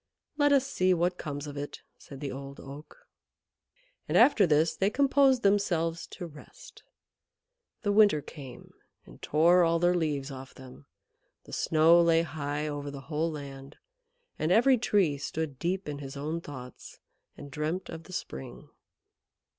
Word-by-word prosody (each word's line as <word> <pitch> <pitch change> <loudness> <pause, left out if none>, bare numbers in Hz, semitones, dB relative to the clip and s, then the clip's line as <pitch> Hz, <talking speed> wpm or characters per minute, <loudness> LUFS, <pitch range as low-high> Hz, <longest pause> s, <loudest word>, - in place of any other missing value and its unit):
"Let 290 -1 +3
us 275 -2 +4
see 185 -8 +1
what 175 +1 0
comes 145 -2 -5
of 145 -1 -8
it," 145 0 -7 0.2
said 140 -1 -12
the 140 - -4
Old 135 +1 -8
Oak. 150 - -12 1.0
And - - +2
after 220 -10 +6
this 155 +1 +2
they 195 - +1
composed 270 0 +3
themselves 175 -5 +1
to 175 - -8
rest. 165 - -14 1.0
The 205 - +1
winter 205 -6 +5
came 135 -3 -11 0.3
and - - -16
tore 170 +4 +4
all 165 0 +2
their 175 +1 +3
leaves 150 -5 -1
off 130 0 -10
them, 130 +2 -14 0.6
the - - -14
snow 165 +2 +4
lay 165 -1 +4
high 150 -2 -4
over 145 -1 -4
the 140 -1 -8
whole 155 +2 0
land, 140 -2 -9 0.6
and 155 - 0
every 245 +5 +5
Tree 190 -11 +1
stood 145 -2 -4
deep 185 +1 -2
in 145 -1 -5
his 135 -1 -8
own 155 +4 -3
thoughts 130 -5 -10 0.4
and 145 -1 -10
dreamt 155 +6 -3
of 165 0 -8
the 185 - -12
spring. 65 - -7
160 Hz, 155 wpm, -29 LUFS, 145-185 Hz, 1.0 s, after